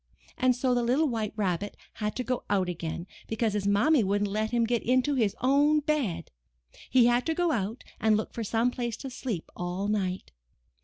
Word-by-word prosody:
And 255 -1 +3
so 255 +1 +1
the 245 - +2
little 260 +7 +2
White 220 -5 -2
Rabbit 200 -1 -2 0.2
had 210 -1 -3
to 250 - -2
go 250 0 -2
out 190 -3 +2
again, 170 -1 -4 0.2
because 220 -1 0
his 205 -1 -1
Mammy 225 +7 +4
wouldn't 205 +1 0
let 215 +1 0
him 235 0 +1
get 230 0 +1
into 255 +4 +2
his 225 -7 +1
own 285 +4 +4
bed. 290 - -1 0.6
He 250 -2 +5
had 240 +1 +3
to 320 - +1
go 350 -1 +1
out 225 -1 -2 0.2
and 215 -1 +3
look 215 - -4
for 230 - -3
some 230 +3 +1
place 240 -2 -3
to 270 +1 -7
sleep 235 -9 -5
all 180 +3 -3
night. 190 -3 -2
230 Hz, 200 wpm, -28 LUFS, 205-255 Hz, 0.6 s, He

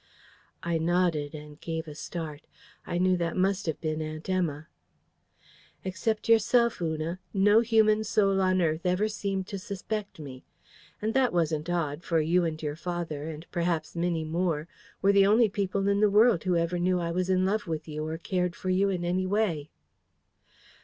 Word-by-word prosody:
(I 170 -1 0
nodded 165 -3 +1
and 150 0 -11
gave 160 0 -4
a 150 - -7
start. 155 0 -6 0.4
I 175 - -2
knew 185 +1 +3
that 170 0 -2
must 190 0 +1
have 160 - -2
been 155 -1 -2
Aunt 155 0 -6
Emma.) 165 -5 -1 1.2
"Except 200 +4 -2
yourself, 230 0 +3
Una, 160 +2 -2 0.2
no 205 +3 +5
human 220 -2 +3
soul 195 -3 +2
on 185 -1 +2
earth 160 0 0
ever 180 +3 +1
seemed 200 -3 -3
to 200 - -4
suspect 205 +2 -5
me. 135 -4 -9 0.6
And 220 +1 0
that 260 -2 +3
wasn't 160 -2 0
odd; 165 -3 -1
for 165 -2 +1
you 170 +3 +2
and 160 -1 -3
your 150 -1 -2
father, 165 -3 -4
and 160 +1 -8
perhaps 170 -3 -1
Minnie 170 -2 -1
Moore, 165 -1 -1 0.4
were 200 +1 +5
the 200 0 +6
only 220 +2 +5
people 195 0 -1
in 200 0 +2
the 210 0 +4
world 210 -3 +4
who 180 -1 +2
ever 170 +1 0
knew 180 +1 +2
I 170 -1 -2
was 180 +2 -1
in 185 0 +3
love 205 +1 0
with 160 -1 -4
you 155 0 -4
or 160 +1 -3
cared 180 +1 -1
for 185 - -3
you 195 +2 +3
in 180 -2 -2
any 185 +2 0
way." 185 -8 0
180 Hz, 180 wpm, -28 LUFS, 160-195 Hz, 1.2 s, the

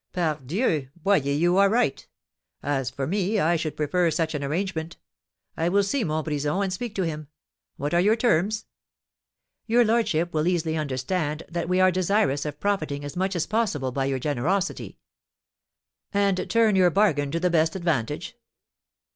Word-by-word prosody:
"Pardieu! 155 - -1
Boyer, 195 +3 +2
you 175 +5 +2
are 200 0 +5
right. 215 - 0 0.6
As 135 -3 -1
for 135 +1 -4
me, 200 +6 0
I 170 -1 +3
should 160 -2 -3
prefer 170 +3 +1
such 160 0 -1
an 145 -1 -3
arrangement. 165 +2 -3 0.6
I 165 +1 0
will 200 +2 +3
see 235 +6 0
Montbrison, 155 +1 -1
and 190 -2 -2
speak 230 +3 -5
to 190 - 0
him. 155 -3 -4 0.5
What 145 +3 -3
are 175 - +4
your 210 +4 +4
terms?" 215 -2 +1 1.0
"Your 240 +1 +4
lordship 195 -7 +1
will 155 +1 +1
easily 165 -3 0
understand 150 +2 -2
that 170 0 -3
we 180 0 +2
are 185 0 +5
desirous 180 -6 +1
of 150 -1 -5
profiting 155 -8 -1
as 145 - -7
much 190 +1 -1
as 170 - 0
possible 200 - -1
by 135 +1 -1
your 135 -1 0
generosity." 150 +9 -2 1.1
"And 200 -2 +1
turn 225 -3 +3
your 185 -2 +5
bargain 160 -7 +2
to 165 +4 -2
the 180 +1 +1
best 160 0 +2
advantage? 165 -11 -2
170 Hz, 165 wpm, -25 LUFS, 150-195 Hz, 1.1 s, are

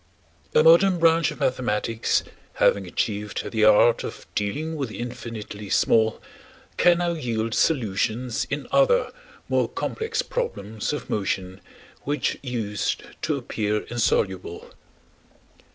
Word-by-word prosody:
A - - +6
modern 175 +3 +6
branch 165 -1 +4
of - - -8
mathematics 115 -3 0 0.3
having 100 -2 +2
achieved 105 +3 -3
the 110 -2 +3
art 110 +2 +5
of - - -7
dealing 150 +11 -2
with 140 -5 -3
the - - -8
infinitely 110 -4 -7
small 110 +2 +3 0.6
can 175 -1 +5
now 175 0 0
yield 115 -8 -2
solutions 120 -3 0
in 140 0 -3
other 275 - +3 0.4
more - - +1
complex 450 0 -2
problems 110 - -3
of 150 - -5
motion 95 -2 -2 0.4
which 145 -1 -1
used 115 -6 -2 0.2
to - - 0
appear 105 0 -2
insoluble. 95 -7 -1
115 Hz, 120 wpm, -24 LUFS, 105-160 Hz, 0.6 s, A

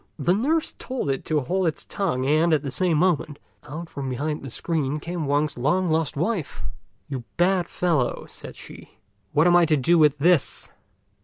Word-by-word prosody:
The 165 +3 +2
nurse 300 - +1
told 255 - -2
it 135 - -3
to 155 -1 +1
hold 180 +6 0
its 160 - -3
tongue, 160 -10 -1
and, 155 +4 +3
at 150 - -2
the 140 - -4
same 175 +1 +1
moment, 155 -4 +1 0.3
out 155 +4 -7
from 140 -4 -5
behind 150 +4 -2
the 135 - -7
screen 150 +2 -2
came 170 -1 -4
Wang's 145 -1 0
long 175 +8 +1
lost 160 -2 0
wife. 175 0 -2 0.4
"You 135 -4 -5
bad 180 0 +2
fellow," 160 -9 0
said - - -9
she, - - -12 0.3
"what 150 +2 +3
am 175 0 +5
I 175 -1 +6
to 155 -1 +2
do 165 +6 +3
with 150 -2 +5
this?" 165 +1 +2
155 Hz, 185 wpm, -24 LUFS, 145-175 Hz, 0.4 s, I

